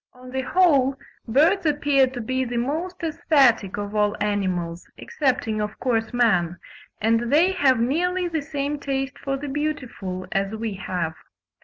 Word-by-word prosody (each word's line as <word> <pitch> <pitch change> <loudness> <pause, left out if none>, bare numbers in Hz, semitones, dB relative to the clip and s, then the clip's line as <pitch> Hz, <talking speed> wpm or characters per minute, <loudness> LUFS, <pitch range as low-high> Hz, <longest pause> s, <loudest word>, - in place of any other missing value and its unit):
On 250 0 -13
the 265 0 -1
whole, 275 -4 +3 0.3
birds 315 - +3
appear 290 -3 +3
to 250 -1 -6
be 260 +3 -1
the 245 -1 -3
most 330 +9 -3
aesthetic 270 - +2
of 205 0 -4
all 210 0 +1
animals, 185 -5 -2
excepting 250 - -1
of 210 0 -4
course 225 -3 0
man, 195 -8 +2 0.4
and 230 +2 +1
they 335 +6 +5
have 275 -10 +3
nearly 350 +9 +1
the 325 -3 -2
same 285 0 -3
taste 270 0 -3
for 275 0 -2
the 290 +2 -6
beautiful 260 -11 -4
as 195 +2 -1
we 220 -1 -3
have. 180 -4 -3
255 Hz, 155 wpm, -23 LUFS, 210-290 Hz, 0.4 s, they